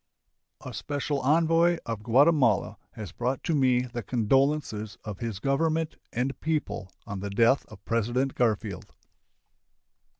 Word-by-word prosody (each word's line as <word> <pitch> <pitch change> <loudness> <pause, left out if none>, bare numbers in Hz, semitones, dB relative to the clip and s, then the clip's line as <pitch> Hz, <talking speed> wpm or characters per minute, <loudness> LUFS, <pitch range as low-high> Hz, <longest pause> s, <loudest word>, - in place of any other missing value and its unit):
A - - -6
special 145 0 -2
envoy 165 +4 +3
of 115 -2 -4
Guatemala 125 -1 +3 0.2
has 105 -6 -7
brought 125 +6 -2
to 165 - 0
me 130 -4 +3
the 120 -1 -5
condolences 120 -1 0
of 105 -3 -7
his 115 -4 -4
Government 155 +6 0 0.2
and 130 +3 -2
people 150 -11 -2
on 100 -1 -5
the 100 +1 -4
death 115 +7 +3
of 110 -3 -15
President 120 +4 0
Garfield. 105 -5 -1
125 Hz, 130 wpm, -27 LUFS, 110-145 Hz, 0.2 s, envoy